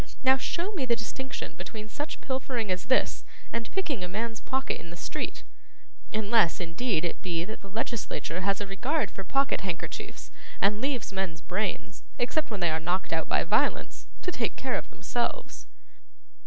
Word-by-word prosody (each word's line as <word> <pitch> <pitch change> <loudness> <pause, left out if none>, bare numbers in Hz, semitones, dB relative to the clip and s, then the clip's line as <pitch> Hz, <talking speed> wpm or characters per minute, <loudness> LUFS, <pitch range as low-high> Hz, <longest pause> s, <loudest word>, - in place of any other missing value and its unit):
Now, 265 0 +8
show 345 +8 -1
me 305 -11 -1
the 235 - +5
distinction 255 +3 -4
between 215 -1 -6
such 295 +8 -4
pilfering 255 -5 0
as 185 0 -1
this, 260 - +3 0.3
and 230 -1 -1
picking 310 - 0
a - - -1
man's 220 +4 -2
pocket 265 +1 0
in 170 - -9
the 170 - -7
street: 235 - -3 0.7
unless, 215 -4 +4
indeed, 175 +1 +1
it - - -2
be, 170 -2 0
that 215 +3 -6
the 195 - -10
legislature 195 - -1
has 195 +1 +2
a 205 - -1
regard 250 - +1
for 195 - -5
pocket 275 +8 +2
handkerchiefs, 180 -3 -4 0.3
and 210 +2 +4
leaves 265 -6 0
men's 190 -4 -1
brains, 190 +1 -1 0.2
except 305 +6 +1
when 210 -4 -3
they 170 -2 +4
are 160 - +1
knocked 175 +4 0
out - - +1
by - - +4
violence, - - +2 0.2
to 360 - +1
take - - 0
care - - -1
of - - -2
themselves. - - -2
215 Hz, 175 wpm, -30 LUFS, 185-260 Hz, 0.7 s, Now